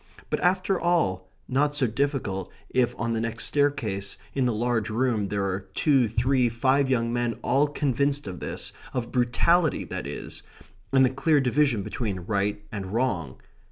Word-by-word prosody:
But, - - +1
after 185 +1 +2
all, 95 - +1 0.2
not 145 +3 +1
so 145 -3 +3
difficult 115 - -1 0.2
if 125 -2 +2
on 115 +1 -1
the 110 - -1
next 115 0 -2
staircase, 125 -10 0 0.2
in 130 -2 +1
the - - +2
large 115 -1 0
room, 110 -2 0
there 100 0 -1
are 95 0 -3
two, 135 -6 +3
three, 125 +3 +2
five 130 +4 +2
young 115 -2 +1
men 120 -1 -1
all 145 +2 +3
convinced 140 0 0
of 90 -3 -6
this - - -6 0.2
of 120 -2 -2
brutality, 140 +7 +2
that - - -5
is, - - -7 0.5
and 135 -1 +6
the 130 - +1
clear 145 +3 +3
division 135 -4 +2
between 100 -4 -3
right 100 +2 -1
and 100 -3 -4
wrong. 100 - -1
120 Hz, 165 wpm, -26 LUFS, 105-140 Hz, 0.5 s, and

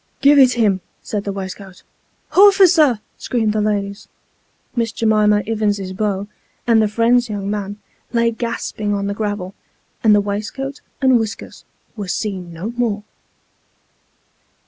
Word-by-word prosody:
" - - -43
Give 285 +1 +6
it 255 -2 +6
him," 205 -6 +1 0.2
said 210 -5 -4
the 200 - -2
waistcoat. 190 -1 -8 0.3
" - - -42
Horficer! 360 - +6
" - - -43
screamed 220 -4 0
the 215 - 0
ladies. 200 -1 -2 0.7
Miss 230 -2 0
J'mima 210 -1 +2
Ivins's 205 -4 -1
beau, 200 0 -2 0.4
and 230 -2 +4
the 215 - +3
friend's 235 +3 +2
young 200 -1 -3
man, 205 -1 -4 0.3
lay 235 -1 +2
gasping 220 -3 -3
on 200 0 -2
the 200 - -1
gravel, 205 -3 -3 0.5
and 215 -2 +6
the - - +4
waistcoat 215 +8 -4 0.2
and 260 -2 +5
whiskers 220 -2 -6 0.3
were 205 -4 -5
seen 185 -2 -3
no 175 +7 -5
more. 235 -4 -1
210 Hz, 145 wpm, -19 LUFS, 200-235 Hz, 0.7 s, Give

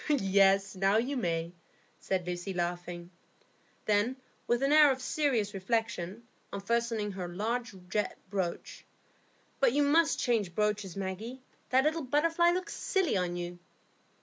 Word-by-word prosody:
"Yes, 195 -6 +3
now 195 +2 +3
you 255 +5 0
may," 170 -7 -1 0.5
said 185 -2 -2
Lucy, 180 +2 -4
laughing. 175 0 -4 0.7
Then, 215 +5 +2 0.3
with 240 +2 +1
an 275 - +2
air 305 -1 +8
of 265 -1 0
serious 250 -6 0
reflection, 205 0 -2 0.3
unfastening 225 0 -1
her 185 -2 -5
large 220 +5 -3
jet 210 +2 -1
brooch, 185 -4 -3 0.8
"But 265 -3 +4
you 290 +1 +3
must 315 +3 +3
change 215 -8 0
brooches, 210 -3 0
Maggie; 205 +7 -5 0.3
that 260 +1 +4
little 315 +2 +1
butterfly 330 +5 +2
looks 360 +1 -1
silly 380 - 0
on 180 -2 0
you." 175 0 -5
210 Hz, 135 wpm, -30 LUFS, 185-260 Hz, 0.8 s, air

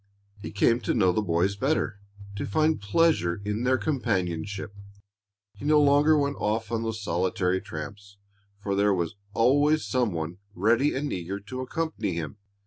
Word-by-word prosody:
He - - -6
came 115 +4 +3
to 110 - -1
know 95 -6 +4
the 100 - 0
boys 90 +1 +1
better, 130 -3 -1 0.4
to 100 - -3
find 155 +5 +1
pleasure 100 - +2
in 105 +4 -2
their 130 +1 +3
companionship. 100 - -2 0.8
He - - -14
no 150 +1 +4
longer 145 +2 +5
went 140 -1 0
off 110 +1 -1
on 115 -1 0
those 110 -2 -4
solitary 90 0 0
tramps, 100 +5 -8 0.4
for 100 -1 -2
there 100 0 +3
was 85 -1 -2 0.2
always 145 +6 +3
some 125 -5 +1
one 85 +2 -4 0.2
ready 115 +9 +2
and 140 +2 -2
eager 95 +2 -4
to 130 +6 -6
accompany 130 - -2
him. 85 +4 -5
105 Hz, 160 wpm, -26 LUFS, 95-135 Hz, 0.8 s, longer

